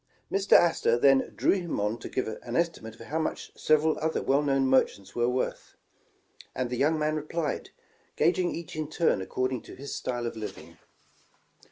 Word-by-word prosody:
Mr 195 0 +2
Astor 165 -8 +5
then 135 +1 +4
drew - - +3
him 175 - -1
on 105 +3 -1
to - - -7
give 130 - -2
an 115 +2 -6
estimate 160 -10 -1
of - - -16
how 160 +6 -2
much 160 - -3
several 155 0 +2
other 160 +1 0
well 140 +2 +3
known 135 -2 +2
merchants 130 -7 +1
were 120 0 +1
worth, 125 +1 -3 0.8
and 125 -1 -2
the - - 0
young 155 +5 +2
man 155 0 0
replied, 155 0 -3 0.5
gauging 175 +2 +2
each 170 -1 -6
in 155 -1 -3
turn 160 - +1
ac 95 - -6
cording 130 -1 -1
to - - -12
his 140 +2 -7
style 120 -1 -3
of 115 - -4
living. 110 -1 -8
140 Hz, 185 wpm, -28 LUFS, 120-160 Hz, 0.8 s, Astor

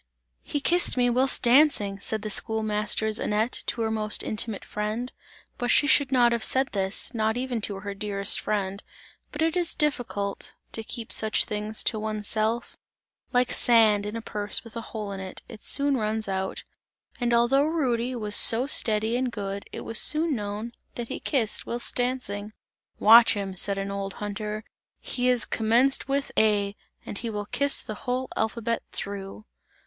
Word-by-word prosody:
"He 290 - -3
kissed 350 -2 +2
me 245 -1 +3
whilst 260 +2 +1
dancing!" 235 -6 +4
said 215 +1 -2
the 215 - -4
schoolmaster's 215 0 +1
Annette 215 +3 0
to 235 - -1
her 220 - -1
most 215 -1 0
intimate 215 -1 -1
friend, 215 +4 -4 0.5
but 245 - -2
she - - +4
should 285 -2 +3
not 245 -2 +4
have 235 -2 -1
said 265 +1 +2
this, 195 +4 -3
not 220 0 0
even 250 -2 -3
to 200 -2 -3
her 200 0 -5
dearest 200 0 0
friend, 200 -1 -2 0.5
but 305 +1 -2
it 325 +1 0
is 350 -2 -1
difficult 245 -9 -2 0.2
to 225 - -1
keep 225 0 -6
such 220 0 +2
things 210 +1 -3
to 220 - 0
one's 215 -1 -3
self 225 +2 0 0.5
like 250 -1 +2
sand 215 -4 +5
in 210 - -6
a 230 - -5
purse 205 -1 -1
with 230 0 -14
a 230 - -4
hole 210 -3 -5
in 195 - -6
it, 190 -1 -8
it 220 -2 -11
soon 280 0 +3
runs 220 -2 -1
out 190 0 -3 0.6
and 240 -1 0
although 240 +4 +3
Rudy 255 -6 -1
was 210 -3 -1
so 235 +3 +5
steady 220 -4 +1
and 250 0 -1
good 200 -2 -5
it - - -7
was 225 - +2
soon 310 -1 +3
known 210 +1 -5 0.2
that 235 -1 -6
he - - -5
kissed 240 -8 -1
whilst 240 0 -3
dancing. 230 -5 -3 0.4
"Watch 225 +1 +7
him," 195 -2 -4
said 200 +2 +3
an 195 0 -3
old 195 0 -4
hunter, 210 +1 -5 0.4
"he 250 0 -2
has 250 -2 +4
commenced 240 +5 +2
with 275 0 -1
A, 205 -2 +2 0.3
and 200 - -6
he 230 - -4
will 205 -1 -4
kiss 280 +6 0
the 215 - -6 0.2
whole 255 +1 -1
alphabet 230 +1 -1
through!" 200 +1 -5
220 Hz, 175 wpm, -26 LUFS, 210-245 Hz, 0.6 s, Watch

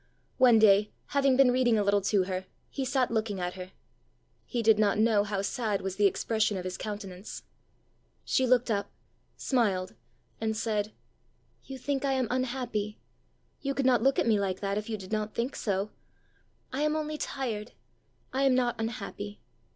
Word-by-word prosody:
One 245 -3 +7
day, 210 -1 +5 0.2
having 275 -2 +3
been 270 -2 +6
reading 245 -3 +3
a 210 - +2
little 200 0 +3
to 195 0 +2
her, 185 0 -4 0.2
he 275 - -3
sat 255 -1 +1
looking 215 -3 -1
at 180 0 -2
her. 185 0 -8 0.8
He 240 -2 -2
did 220 -1 +5
not 205 -2 +3
know 215 -1 +4
how 200 -1 -2
sad 210 -2 -1
was 190 -1 -3
the 205 -1 +5
expression 215 +1 0
of 185 - -4
his 185 0 -4
countenance. 200 -2 -7 0.8
She 260 - +2
looked 245 -1 +3
up, 200 -1 -1 0.5
smiled, 200 -8 0 0.5
and 220 -1 -1
said, 215 -2 -1 0.7
"You 270 - -7
think 275 +1 -2
I 275 -1 +1
am 260 -2 +1
unhappy! 245 -5 -2 0.6
you 275 -1 -2
could 275 - 0
not 250 -3 +4
look 270 +2 +3
at - - +2
me 220 -3 +3
like 190 -2 -1
that 200 0 -1
if 210 +2 -3
you 220 - -2
did 190 -1 -10
not 215 -1 -2
think 240 +4 -2
so! 200 0 -1 0.8
I 270 - -1
am 305 0 +2
only 305 -1 -3
tired; 225 -5 -4 0.6
I 265 - 0
am 270 -2 +4
not 245 -2 +1
unhappy. 205 -2 -5
220 Hz, 180 wpm, -29 LUFS, 200-255 Hz, 0.8 s, One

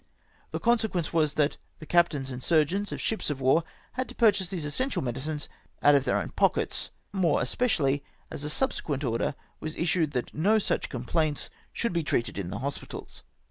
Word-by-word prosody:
The - - -3
consequence 220 -9 +1
was, 155 -3 +2
that 150 -1 +2 0.2
the 155 - -10
captains 150 -6 +2
and 125 0 -5
surgeons 170 +5 +2
of - - -4
ships 220 - -1
of 145 -2 -2
war 135 +5 +4 0.3
had 255 +1 -3
to - - -8
purchase 200 -6 +4
these 175 -6 -3
essential 255 - -1
medicines 135 +5 -3 0.4
out 145 - +8
of 140 -2 +4
theu - - +2
own - - -1
pockets! - - +1 0.2
more 175 -6 +3
especiaUy 145 - +1 0.3
as 140 - -5
a - - -2
subse 260 - 0
quent 140 -2 -2
order 115 +4 0 0.2
was 155 +1 -4
issued 165 -3 +1
that 125 - -2
no 200 +8 +3
such 215 - 0
complaints 145 +4 -1 0.2
should 235 - -1
be 170 - +1
treated 115 -7 0
in 90 -3 -3
the 100 - -4
hospitals 140 - -6
155 Hz, 185 wpm, -28 LUFS, 140-185 Hz, 0.4 s, out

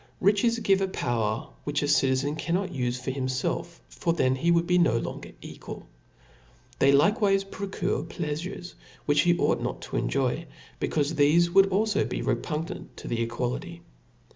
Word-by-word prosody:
Riches 205 +4 +3
give 195 -4 +2
a 195 - +1
power 115 - -1 0.2
which 145 0 -1
a - - 0
citizen 140 0 +2
cannot 180 +4 -1
ufe 125 -4 -2
for 130 +1 -3
himfelf, 130 +6 -3
for 170 - -1
then 130 -6 +2
he 165 +6 0
would 170 0 +3
be 180 0 +3
no 155 -10 +3
longer - - -5
equal. - - -9 0.9
They 135 - +5
likewife 195 - +3
procure 195 -1 -2
pleafures 175 +3 -5 0.3
which 145 0 +4
he 175 0 +3
ought - - +1
not - - -4
to - - -4
enjoy, 135 +5 0 0.3
be - - 0
caufe 150 0 0
thefe 160 +3 +4
would 195 0 +6
be 190 - -1
alfo 210 0 0
repugnant 165 +3 -3
to - - -9
the 115 -1 -1
equality. 125 +9 -3
165 Hz, 165 wpm, -27 LUFS, 135-185 Hz, 0.9 s, would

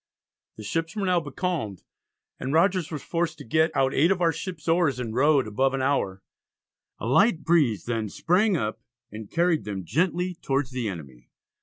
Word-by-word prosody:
The 110 - -8
ships 165 - -2
were 205 -2 -1
now 180 -1 +3
becalmed, 145 - -3 0.6
and 130 - -3
Rogers 180 0 +2
was 155 -3 -6
forced 165 -2 -2
to 145 - -9
get 160 +7 +2
"out 135 0 +2
8 160 +5 +4
of 190 -2 +1
our 170 -2 +3
ships 170 -3 -7
oars, 165 -6 +2
and 115 -3 -4
rowed 140 +2 +3
above 130 +6 +1
an 135 - -1
hour." 100 -9 0 0.7
A - - -6
light 170 - +3
breeze 140 - +2
then 115 -3 -2
sprang 185 - +2
up 110 -6 -3 0.3
and 110 0 -8
carried 170 -2 +1
them 95 -3 -5
gently 175 - 0
towards 135 -1 -1
the 125 -4 -2
enemy. 70 -9 -10
145 Hz, 180 wpm, -26 LUFS, 115-170 Hz, 0.7 s, 8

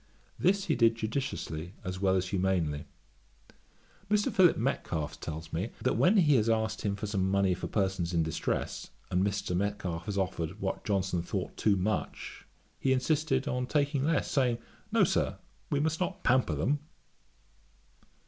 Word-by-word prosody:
This 195 +2 +3
he 160 - +2
did 115 -1 +4
judiciously 110 - -3
as 90 0 -4
well 95 -1 +3
as 95 0 0
humanely. 90 -6 0 1.2
Mr. 210 0 +2
Philip 180 -3 +5
Metcalfe 85 - -2
tells 80 0 -6
me, 90 +8 -1
that - - +2
when 200 +5 +4
he 150 -7 +5
has 110 0 +2
asked 110 -1 0
him 100 -1 -1
for 100 - -5
some 100 -2 0
money 100 -1 +3
for - - -4
persons 95 -4 0
in 85 -2 +2
distress, 80 -1 -2 0.2
and 90 +1 +2
Mr. 100 -2 -1
Metcalfe 95 -3 -2
has 100 -2 -3
offered 95 -1 -2
what 95 -1 -2
Johnson 95 -3 0
thought 85 - -4
too 105 -2 +3
much, 100 +3 -3 0.3
he 130 - +2
insisted 135 0 +1
on 125 0 -1
taking 145 -1 +1
less, 155 +1 +1
saying 125 -4 +2 0.3
'No, - - +3
no, - - +8
Sir; - - +1 0.3
we 145 - +1
must 160 +2 0
not 185 0 -2
pamper 125 -11 +3
them.' 130 - +1
100 Hz, 165 wpm, -30 LUFS, 90-130 Hz, 1.2 s, no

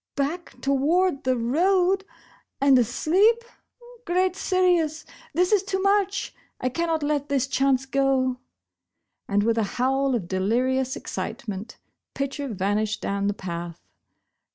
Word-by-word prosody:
" - - -64
Back 345 +3 -8
toward 280 +3 +1
the 255 -1 +2
road 365 +10 +2 0.3
— - - -34
and 275 -2 +5
asleep! 375 - +3 0.6
Great 365 0 +1
Sirius! 355 -5 +1 0.3
This 360 +2 +2
is 415 -3 +4
too 385 -1 -2
much!! 395 0 +1 0.3
I 255 - 0
cannot 325 +3 -1
let 290 -1 -1
this 275 -2 +1
chance 270 -1 +1
go," 265 -1 +1 0.9
and 205 0 +1
with 230 +1 +2
a - - +2
howl 265 +1 +1
of 195 -8 -3
delirious 250 +8 0
excite - - -6
ment. 205 +2 -6 0.4
Pitcher 275 +1 -3
vanished 210 0 -1
down 200 0 -1
the 205 - -1
path 170 -3 -6
275 Hz, 135 wpm, -25 LUFS, 235-355 Hz, 0.9 s, and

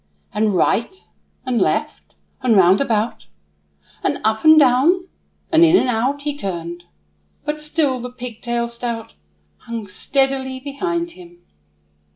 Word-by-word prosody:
And 210 -2 +1
right, 230 - +1 0.5
and 250 -3 0
left, - - -2 0.3
and 240 -5 +3
round 190 +3 +5
about, 220 - -1 0.7
And - - 0
up, 220 0 +1
and 315 0 +8
down, 305 +7 +4 0.4
and 325 0 +6
in, 335 +2 +6
and 260 - +1
out, 255 +5 0
He 295 -1 -2
turned; 175 - -5 0.6
but 300 0 -3
still 300 -4 0
the 250 0 -6
pigtail 240 -1 -4
stout 235 -1 -5 0.4
Hung 230 -2 -6
steadily 265 +5 -1
behind 340 +5 -3
him. 175 - -15
250 Hz, 130 wpm, -20 LUFS, 220-285 Hz, 0.7 s, and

